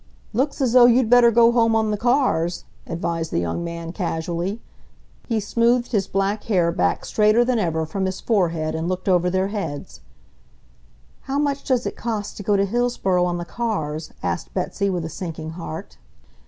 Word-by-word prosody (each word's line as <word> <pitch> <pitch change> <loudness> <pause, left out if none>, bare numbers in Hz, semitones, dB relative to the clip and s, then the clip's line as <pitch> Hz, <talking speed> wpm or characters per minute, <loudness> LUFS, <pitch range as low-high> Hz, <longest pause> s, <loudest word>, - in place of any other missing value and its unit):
"Looks 275 +5 -1
as 250 -3 +1
though 245 -1 +8
you'd 245 -1 +3
better 245 -1 +7
go 235 0 +5
home 230 -2 +3
on 220 -1 +1
the - - +1
cars," 235 - +1 0.2
advised 165 -1 -3
the - - -1
young 85 - -2
man 170 -1 -5
casually. 175 +2 -3 0.7
He 230 -3 0
smoothed 235 +4 +1
his 205 -5 +1
black 195 +2 -1
hair 180 -6 +2
back 90 - 0
straighter 215 +3 +3
than 245 -2 +1
ever 160 -5 0
from 190 +5 -3
his 185 0 -3
forehead 170 -7 0
and 160 +2 -2
looked 185 +1 -3
over 180 -1 +3
their 190 +2 0
heads. 165 -9 -5 1.3
"How 275 - 0
much 285 -1 0
does 255 -2 0
it - - -3
cost 220 -3 -4
to - - -6
go 205 0 +2
to 195 - +2
Hillsboro 200 -5 +1
on 175 -1 0
the 175 - -5
cars?" 160 -9 -3
asked - - -3
Betsy 200 +2 -1
with 175 -3 -2
a - - -3
sinking 160 -2 -6
heart. 165 -1 -8
195 Hz, 180 wpm, -22 LUFS, 170-235 Hz, 1.3 s, though